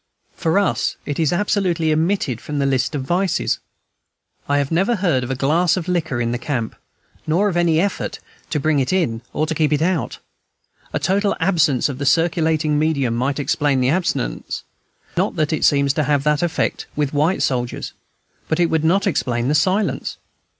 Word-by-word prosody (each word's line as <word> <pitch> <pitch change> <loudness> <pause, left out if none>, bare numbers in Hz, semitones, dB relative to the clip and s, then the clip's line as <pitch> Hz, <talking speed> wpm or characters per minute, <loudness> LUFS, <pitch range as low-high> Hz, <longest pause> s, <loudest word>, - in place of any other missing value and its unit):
For 165 +1 0
us 200 -1 +1
it 145 - -3
is 160 -3 +2
absolutely 175 -4 +1
omitted 160 - 0
from 150 - -5
the 140 - +1
list 135 +2 0
of 135 - -2
vices. 180 +6 0 0.9
I 145 - +3
have 140 0 -1
never 195 +8 +2
heard 175 - +1
of 125 - -5
a 135 - -1
glass 165 +7 +2
of 175 -1 -4
liquor 165 -8 -1
in 120 -1 0
the 120 - -2
camp, 120 -4 -3 0.5
nor 175 +7 +2
of 180 - -3
any 170 -2 +3
effort 200 +2 -1
either - - -29
to 150 - 0
bring 150 0 +2
it 130 -1 0
in 155 -12 0
or 155 - 0
to 160 - -2
keep 155 -1 +1
it 150 0 +1
out. 170 -7 -1 0.7
A - - -1
total 200 +2 +1
absence 160 -7 +2
of 140 -2 -6
the 140 - -1
circulating 160 -2 +2
medium 140 -7 +1
might 130 +3 -1
explain 145 -2 +1
the 125 0 +2
abstinence, 150 - -2 0.5
not - - +1
that 155 0 0
it 155 - -1
seems 140 -1 +3
to 155 -1 0
have 145 -1 +1
that 150 0 +2
effect 170 -2 -1
with 145 -1 -1
white 155 +6 +1
soldiers, 125 -2 -2 0.6
but 160 - 0
it 170 -1 +2
would 160 -1 +1
not 185 +5 +2
explain 125 -9 0
the - - +2
silence. 185 +8 0
155 Hz, 190 wpm, -20 LUFS, 140-175 Hz, 0.9 s, I